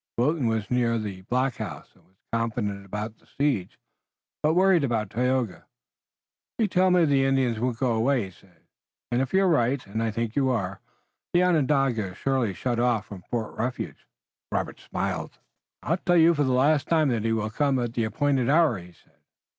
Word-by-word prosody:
Wilton 135 +2 +1
was 110 -1 -2
near 120 -2 +2
the 100 -4 -5
blockhouse 130 +1 -2
and - - -26
was 95 - -34 0.2
confident 110 -4 -2
about 105 +2 -5
the - - -28
siege, 135 -11 -1 0.6
but 155 +2 +2
worried 185 -3 +4
about 110 -6 -1
Tayoga. 125 -4 -1 0.9
"You 225 - +2
tell 185 0 +3
me 180 -1 +4
that - - +5
the 140 -2 +3
Indians 135 -4 +1
won't 120 -1 -1
go 125 -1 +1
away," 120 +1 +1
he 95 - -10
said, 90 0 -24 0.5
"and 120 +1 +2
if 135 - -2
you're 190 0 +3
right, 135 -5 +1
and 105 +3 -4
I 115 - 0
think 115 +1 -3
you 135 -2 +2
are, 100 -6 -2 0.5
the 175 +1 +4
Onondaga 135 - +1
is - - -16
surely 130 -8 0
shut 120 +2 -2
off 120 -3 +1
from 100 -4 -10
Fort 115 -3 -3
Refuge." 125 +3 -4 0.4
Robert - - -2
smiled. - - -4 0.5
"I 165 +6 +1
tell 175 -1 +2
you 165 +1 +6
for 145 -3 +1
the 130 - +1
last 140 +4 +3
time 155 -3 +3
that 115 -4 0
he 115 - 0
will 110 -1 -1
come 140 +2 +1
at 120 -2 -2
the 115 -2 0
appointed 135 0 0
hour," 150 - +4
he 90 0 -13
said. - - -29
125 Hz, 195 wpm, -26 LUFS, 110-145 Hz, 0.9 s, you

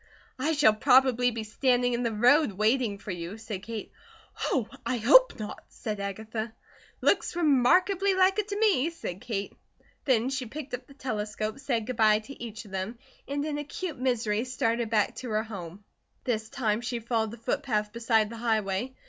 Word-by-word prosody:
"I 305 +5 +1
shall 285 -8 +5
probably 250 +2 +4
be 230 -2 -4
standing 245 +2 +1
in 240 - 0
the 235 -2 0
road 245 +3 +4
waiting 215 +1 +1
for 205 - -7
you," 175 +3 -5
said 215 -3 -6
Kate. 220 0 -6 0.5
"Oh, 245 -6 0 0.2
I 240 +2 -1
hope 305 - +6
not," 210 -1 -6
said 210 -2 -5
Agatha. 220 +3 -4 0.5
"Looks - - +2
remarkably 360 +6 +3
like 380 +2 +4
it 415 - -1
to 405 -1 -3
me," 390 -9 +3
said 210 - -7
Kate. 215 -5 -4 0.5
Then 255 -2 +2
she 265 -2 -3
picked 285 +3 -8
up 250 - -5
the 275 - -16
telescope, 215 -2 -3
said 245 -6 -1
good 255 -1 -5
bye 215 -1 +5
to 230 +4 -9
each 225 -1 -7
of 205 - -14
them, 195 +5 -4 0.3
and 285 +1 -2
in 295 -1 -2
acute 295 0 -5
misery 230 -4 0
started 235 -2 -1
back 215 -2 +2
to 250 - -6
her 215 0 0
home. 195 -3 -8 0.4
This 220 -3 -2
time 220 -3 0
she 240 0 -3
followed 225 -1 -1
the 230 - -9
footpath 225 -4 -1
beside 230 -2 +2
the 230 - -7
highway. 220 +1 -1
235 Hz, 180 wpm, -28 LUFS, 215-270 Hz, 0.5 s, hope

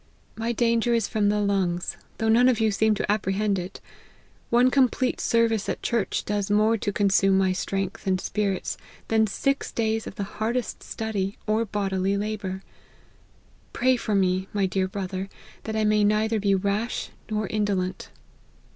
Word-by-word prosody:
My 225 +1 -2
danger 235 0 +2
is 230 -3 +1
from 210 -2 +1
the 210 0 +1
lungs: 190 -4 0 0.2
though 225 - -1
none 240 +3 +5
of 240 -3 +1
you 220 -1 +3
seem 215 +1 +2
to 205 - -1
apprehend 200 -1 0
it. 180 +1 -7 0.7
One 245 +2 +4
complete 255 -1 +2
service 230 -2 +2
at - - -3
church 235 -4 -1
does 205 -1 -1
more 215 +2 +3
to 205 -2 -2
consume 195 -1 +3
my 190 -1 +3
strength 195 +2 -3
and 185 -1 +2
spirits 195 -1 -2 0.3
than 220 -1 +3
six 275 +7 -1
days 220 -1 -1
of - - -8
the 200 - -3
hardest 225 +4 -3
study, 205 -3 -3
or 220 +2 +1
bodily 195 -1 -1
labour. 200 -2 -4 1.1
Pray 255 +1 +3
for 220 -3 -2
me, 190 -1 +1
my 200 -2 +1
dear 190 0 0
brother, 190 0 -4 0.4
that 220 - -3
I 220 - +1
may 210 0 +3
neither 215 +2 +2
be 200 -1 +2
rash 200 +4 -2 0.2
nor 215 0 -1
indolent." 195 -3 -2
210 Hz, 165 wpm, -25 LUFS, 195-225 Hz, 1.1 s, none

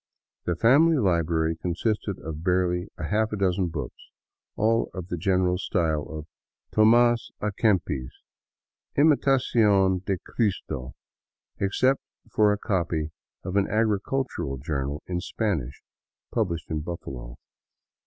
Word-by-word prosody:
The 90 - 0
family 145 - +5
library 85 - +1
consisted 100 +4 -2
of 80 0 -6
barely 90 0 +1
a - - -6
half 110 +1 +2
dozen 95 -1 +1
books, 75 -6 -7 0.5
all 115 +2 +2
of 90 -1 -6
the - - -1
general 90 0 +1
style 80 -6 0
of 75 -1 -6 0.5
Tomas 120 +2 +4
a 105 - -1
Kempis' 90 - 0 0.4
" - - -43
Imitacion 115 - +3
de 95 0 -1
Cristo," 90 - -2 0.6
except 130 +7 +2 0.3
for 105 -1 +4
a 105 - +1
copy 85 -6 -1 0.3
of 95 +1 -4
an 100 -1 +3
agricultural 110 - 0
journal 70 +1 -3
in 90 -1 -2
Spanish, 85 - -2 0.5
published 85 -10 -2
in 80 - 0
Buffalo. 65 -7 -7
95 Hz, 120 wpm, -26 LUFS, 80-110 Hz, 0.6 s, family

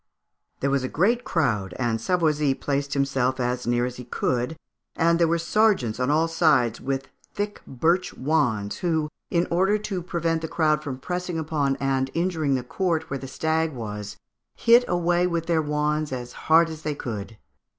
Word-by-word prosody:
There 140 - +1
was 140 -1 +1
a - - -1
great 230 +9 +2
crowd, 110 - 0
and 115 -3 -1
Savoisy 150 -4 +2
placed 140 0 -2
himself 135 -2 +1
as 125 0 -1
near 120 0 +2
as 125 0 -5
he 125 - -7
could, 125 +5 -1 0.4
and 170 +1 +3
there 170 - +4
were 170 +1 +2
sergeants 170 - +2
on 125 +1 +1
all 155 +3 +3
sides 150 -8 +2
with 135 0 -3 0.3
thick 205 0 -3
birch 170 +8 +1
wands, 120 -8 0
who, 160 -3 0 0.2
in 170 0 +2
order 190 +4 +3
to 200 -3 -4
prevent 165 -1 -1
the 160 - -3
crowd 155 -2 +1
from 135 -4 -5
pressing 180 +4 -3
upon 150 -3 0
and 135 -1 0
injuring 165 -5 +1
the 130 - -2
court 160 +2 -1
where 135 - -2
the 135 - -7
stag 160 +3 0
was, 105 -4 -6 0.4
hit 235 +1 +5
away 175 0 +2
with 170 -2 -1
their 165 -1 +2
wands 150 0 -1
as 125 -1 -5
hard 165 +1 +4
as 160 -1 -8
they 150 -1 -2
could. 110 -4 -6
150 Hz, 180 wpm, -25 LUFS, 130-170 Hz, 0.4 s, hit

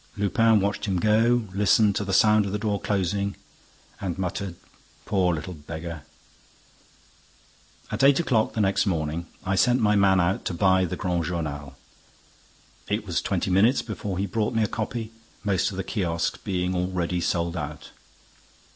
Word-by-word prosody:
Lupin 110 +2 +3
watched 100 0 -1
him 95 -3 0
go, 110 +4 +3
listened 100 +1 +3
to - - -1
the 100 - -4
sound 105 +1 +4
of - - -4
the 105 - -1
door 105 -2 -2
closing 100 0 -1 0.6
and 95 -3 -3
muttered: 95 0 -3 0.5
"Poor 95 -4 +2
little 85 +2 -4
beggar!" 80 +1 -7 1.9
At - - -1
eight 140 +2 +6
o'clock 120 -10 +1
the 110 - 0
next 100 +1 +2
morning, 80 -1 -2 0.2
I 95 - 0
sent 120 +6 +3
my 105 -2 +3
man 95 -1 +4
out 90 +2 +1
to 90 - -2
buy 95 +1 +3
the 85 - -4
Grand 90 -4 -1
Journal. 75 -6 -4 1.1
It - - -2
was - - -1
twenty - - -1
minutes 110 +8 +4
before 105 -4 -5
he 100 - 0
brought 105 +3 -1
me 110 - +3
a - - +1
copy, 110 +1 -4 0.3
most 100 -3 +1
of 95 - -7
the 95 - -2
kiosks 85 -5 -2
being 90 -2 -1
already 90 -1 -1
sold 85 0 -1
out. 75 -3 -6
95 Hz, 165 wpm, -25 LUFS, 90-105 Hz, 1.9 s, eight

